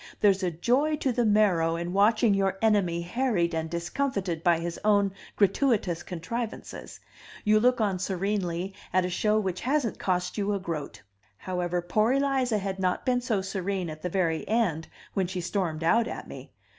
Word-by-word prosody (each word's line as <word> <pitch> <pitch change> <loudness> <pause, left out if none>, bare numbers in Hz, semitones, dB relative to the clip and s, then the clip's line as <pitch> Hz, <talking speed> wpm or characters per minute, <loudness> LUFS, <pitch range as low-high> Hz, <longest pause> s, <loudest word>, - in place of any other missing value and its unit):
There's 200 -2 +4
a 185 - +1
joy 250 - +1
to 275 -3 0
the 240 -1 +1
marrow 185 -6 +3
in 170 +1 -4
watching 215 +2 +4
your 195 -1 +1
enemy 195 -6 +2
harried 180 -4 0
and 160 0 -2
discomfited 175 - -2
by 170 -1 +4
his 170 +1 -4
own 200 -2 +3 0.2
gratuitous 200 -4 +2
contrivances; 220 +7 -6 0.4
you 215 0 +4
look 250 +2 +3
on 200 -4 0
serenely 190 -1 -2 0.2
at 185 0 +3
a 180 - -3
show 210 +4 +2
which 185 -3 -3
hasn't 270 -3 0
cost 180 +1 -1
you 205 0 0
a - - -2
groat. 165 -5 -5 0.3
However, 180 - -2
poor 215 +7 +2
Eliza 270 -4 +1
had 195 -1 -3
not 185 -1 0
been 250 -1 +2
so 220 -6 -1
serene 190 -2 -3
at 155 0 -9
the 180 - -2
very 165 -3 0
end, 195 -8 0 0.3
when 190 -2 0
she 185 0 -4
stormed 170 -3 -2
out 230 +7 +3
at - - -6
me. - - -10
195 Hz, 175 wpm, -27 LUFS, 175-220 Hz, 0.4 s, There's